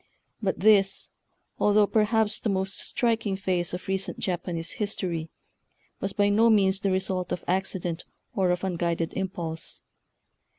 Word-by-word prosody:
But 190 -4 -1
this, 195 -2 +4 0.5
although 210 0 +5
perhaps 220 0 +2
the 220 - -1
most 190 -1 -1
striking 225 -5 0
phase 180 -3 -1
of 180 - -6
recent 190 0 -2
Japanese 175 -3 -2
history, 175 -6 -2 0.7
was 195 - -2
by 205 0 +2
no 220 +3 +5
means 195 -3 +4
the 200 - 0
result 185 -1 -1
of - - -2
accident 180 -2 -1 0.3
or 190 -2 +2
of 180 +1 0
un 185 -3 -1
guided 170 -1 -1
impulse. 170 -4 -3
190 Hz, 140 wpm, -27 LUFS, 180-205 Hz, 0.7 s, although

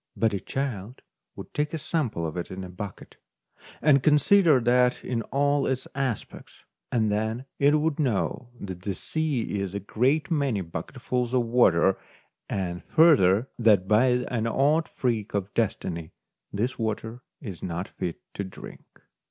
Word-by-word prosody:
But 110 +1 +2
a 100 - -1
child 125 -4 -4 0.3
would - - -10
take 150 +2 -1
a - - -1
sample 130 - -2
of 80 - -4
it 90 - -4
in 95 0 -6
a 90 - -7
bucket, 95 +1 -8 0.7
and 140 -3 +5
consider 155 +1 +5
that 125 +1 +2
in 120 -2 -1
all 145 +1 +2
its 130 -1 -1
aspects; 130 -5 -4 0.4
and 110 -3 +2
then 110 +4 -1
it 145 +2 +5
would 155 0 -1
know 125 -2 -1
that 95 -3 -7
the 95 0 -3
sea 140 - -2
is 100 0 -3
a - - -1
great 130 - 0
many 140 -10 +1
bucketfuls 120 +9 -3
of 125 -2 +2
water, 95 -6 +4 0.5
and 90 -2 -3
further 130 - +4
that 105 -5 +4
by 110 +5 +4 0.2
an 115 -2 -1
odd 145 +7 +2
freak 115 -5 -2
of 100 0 -2
destiny 85 -7 -2 0.4
this 120 +6 -2
water 110 +2 -3 0.2
is 100 - -8
not 90 +2 -3
fit 85 -2 -5
to 100 - -3
drink. 95 - -12
115 Hz, 155 wpm, -26 LUFS, 100-135 Hz, 0.7 s, and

